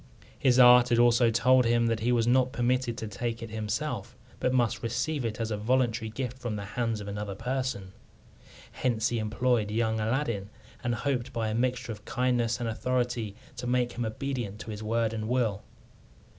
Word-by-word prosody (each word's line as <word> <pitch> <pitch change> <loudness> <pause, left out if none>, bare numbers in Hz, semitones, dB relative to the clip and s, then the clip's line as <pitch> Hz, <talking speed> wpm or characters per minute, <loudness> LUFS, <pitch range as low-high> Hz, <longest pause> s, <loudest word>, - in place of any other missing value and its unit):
His 130 -2 +3
art 125 -1 +8
had 120 - +3
also 120 0 +5
told 125 +3 +4
him 120 0 +3
that 115 -1 +1
he 115 +3 +1
was 120 -2 +2
not 130 +1 +3
permitted 120 0 0
to 110 - -4
take 115 +3 -4
it 115 - -8
himself, 110 +1 -3 0.2
but 125 - +1
must 120 -2 +1
receive 130 +5 -1
it 115 -1 -3
as 115 -1 -2
a 105 - -1
voluntary 115 0 +1
gift 125 +2 -5
from 120 -4 -3
the 100 -1 -5
hands 115 -3 -1
of 100 - -7
another 100 -1 -4
person. 125 -4 -3 0.8
Hence 115 -4 0
he 120 - -1
employed 110 0 +1
young 110 0 0
Aladdin, 110 -3 -1 0.3
and 120 -1 0
hoped 130 -1 -2
by 115 -3 -2
a - - -2
mixture 125 +1 -1
of 105 -1 -8
kindness 120 -2 0
and 120 - -2
authority 120 -2 -1 0.2
to 125 - -4
make 125 0 +1
him 120 - -4
obedient 115 -2 -3
to 110 - -7
his 105 0 -6
word 115 +1 0
and 110 0 -3
will. 115 -5 0
120 Hz, 190 wpm, -28 LUFS, 110-125 Hz, 0.8 s, art